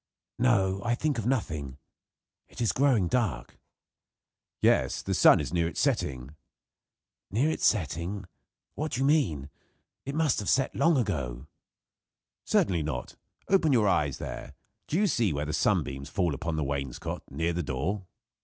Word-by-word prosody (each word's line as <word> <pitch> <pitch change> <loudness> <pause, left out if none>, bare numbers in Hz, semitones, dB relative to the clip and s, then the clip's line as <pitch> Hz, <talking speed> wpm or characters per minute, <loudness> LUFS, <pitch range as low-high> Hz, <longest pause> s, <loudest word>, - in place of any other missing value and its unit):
"No, 100 -6 +2
I 120 0 +1
think 145 -1 -1
of 115 - -3
nothing, 80 - -2 0.7
It - - -13
is 115 -3 +2
growing 130 -9 +3
dark." 90 - -2 1.0
"Yes; - - +2
the - - -2
sun - - +6
is - - -4
near 85 -1 +2
its 85 - -5
setting." 70 +1 -1 0.9
"Near 130 +10 +1
its - - +2
setting? 90 +2 -1 0.5
What 155 0 -4
do 125 - -1
you - - +3
mean? 85 - +1 0.5
It 140 +2 -5
must 155 -5 +2
have 105 - -2
set 135 -1 +2
long 165 -3 +3
ago." 70 - -2 1.0
"Certainly 90 -4 +2
not. 75 -5 -4 0.3
Open 185 -6 +3
your 115 -5 +4
eyes 75 -7 +1
there. - - -7 0.3
Do 155 - 0
you 210 - +3
see 115 - +1
where 75 +1 -2
the 75 - -3
sunbeams 70 -2 0
fall 85 -3 0
upon 85 +4 -3
the 80 - -1
wainscot, 70 -2 -4
near 80 +5 -1
the 90 - -1
door?" 85 +8 -3
95 Hz, 155 wpm, -28 LUFS, -, 1.0 s, sun